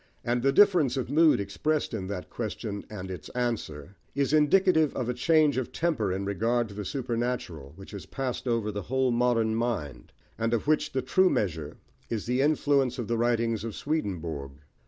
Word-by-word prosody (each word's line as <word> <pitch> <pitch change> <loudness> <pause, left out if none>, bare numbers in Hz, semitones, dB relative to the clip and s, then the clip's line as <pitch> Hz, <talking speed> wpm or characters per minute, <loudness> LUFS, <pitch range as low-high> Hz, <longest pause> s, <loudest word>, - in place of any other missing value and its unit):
And 120 +1 +1
the 135 +2 +3
difference 165 -8 +4
of 130 0 -3
mood 155 -2 +5
expressed 135 +10 -1
in 95 -4 -3
that 95 -2 -5
question 105 -2 -4
and 95 -3 -6
its 90 -5 -8
answer, 100 - -3 0.2
is 140 +1 +1
indicative 160 0 +4
of 125 - -2
a - - 0
change 150 +2 +3
of 130 - -2
temper 140 - 0
in 95 +2 -2
regard 115 +4 0
to - - -10
the 105 0 -5
supernatural 120 - -3
which 95 +2 -12
has 100 -6 -8
passed 130 -1 -4
over 115 -3 0
the 105 0 -4
whole 130 +5 0
modern 120 -2 +2
mind, 110 - -3 0.3
and 115 +1 +1
of 115 - -3
which 155 0 +1
the 130 - -1
true 185 +8 +4
measure 80 - -2 0.3
is 110 -3 -3
the 125 +2 +1
influence 140 -3 +2
of 120 -4 -4
the 115 - 0
writings 115 -2 +1
of 115 -2 -5
Swedenborg. 85 - -3
120 Hz, 185 wpm, -28 LUFS, 100-135 Hz, 0.3 s, mood